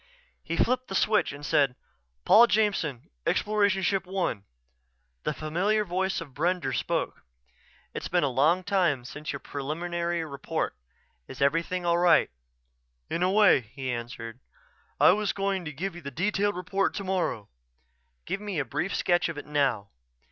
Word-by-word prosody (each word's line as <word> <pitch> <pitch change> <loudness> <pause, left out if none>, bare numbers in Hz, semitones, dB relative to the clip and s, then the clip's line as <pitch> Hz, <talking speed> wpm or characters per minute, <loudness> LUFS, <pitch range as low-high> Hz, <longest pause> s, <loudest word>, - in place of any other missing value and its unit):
He - - -4
flipped 255 +1 +1
the 195 - -5
switch 215 +2 +2
and 145 +1 -9
said, 140 -5 +2 0.5
"Paul 235 +2 +8
Jameson, 195 - 0 0.2
Exploration 205 -2 +2
Ship 195 +1 +1
One." 180 - -2 0.8
The - - +1
familiar 185 +9 0
voice 190 +1 -1
of 145 -5 -9
Brender 175 +5 0
spoke: - - -2 0.7
"It's - - -4
been 175 -2 +1
some 145 +7 +2
time 170 -11 +1
since 145 +4 -6
your 140 - -5
preliminary 170 +5 -3
report. 140 -2 -3 0.5
Is - - -10
everything 165 +5 +1
all 170 0 +3
right?" 175 0 +4 0.8
"In 170 - -1
a 180 - +3
way," 205 -5 +6
he 130 +3 -6
answered. 120 0 -6 0.6
"I - - +7
was 210 -1 0
going 195 -2 -1
to 150 - -4
give 180 +6 -4
you 175 - -10
the 140 - -6
detailed 205 +7 0
report 195 +2 -1
tomorrow." 185 - -2 0.8
"Give 195 - -3
me 205 -4 -4
a 145 - 0
brief 190 - -2
sketch 175 -1 +2
of 165 - -6
it - - -6
now." 135 -9 0
175 Hz, 155 wpm, -27 LUFS, 140-195 Hz, 0.8 s, Paul